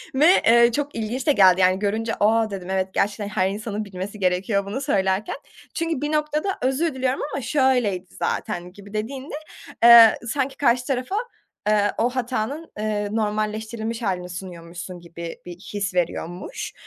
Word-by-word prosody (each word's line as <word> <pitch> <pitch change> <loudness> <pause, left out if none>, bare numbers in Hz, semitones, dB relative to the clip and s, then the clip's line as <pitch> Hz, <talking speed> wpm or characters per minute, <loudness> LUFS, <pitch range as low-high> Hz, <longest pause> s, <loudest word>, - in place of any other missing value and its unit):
ve, 300 +4 +5 0.2
ııı, 235 0 +6
çok 290 +3 -3
ilginç 235 +5 -3
de - - +6
geldi, 190 -6 +5
yani, 185 +1 +4
görünce, 220 +2 -1
a, 220 +1 +3
dedim, 190 -2 -6
evet 190 0 -1
gerçekten 205 0 0
her 190 -2 +1
insanın 210 +1 -4
bilmesi 195 +2 -7
gerekiyor 195 +2 +1
bunu 230 +8 -4
söylerken. 195 -6 0 0.4
Çünkü 330 -4 -2
bir 295 - -1
noktada 300 +4 0
özür 270 +5 +1
diliyorum 260 0 -1
ama 275 - -2
şöyleydi 245 - +1
zaten 180 +1 -3
gibi 205 +1 -13
dediğinde, 260 +7 -4 0.5
ııı, 235 -2 +10 0.2
sanki 270 +2 -2
karşı 245 -2 +2
tarafa, 260 +7 -2 0.5
ııı, 205 -1 +3
o 240 +2 +2
hatanın, 255 +4 -3
ııı, 210 0 -2
normalleştirilmiş 220 +2 -2
hâlini 180 -4 -2
sunuyormuşsun 175 0 -8
gibi 170 -1 -8
bir 175 -1 -8 0.2
his 200 -2 -2
veriyormuş. 175 0 -3
215 Hz, 155 wpm, -23 LUFS, 190-255 Hz, 0.5 s, ııı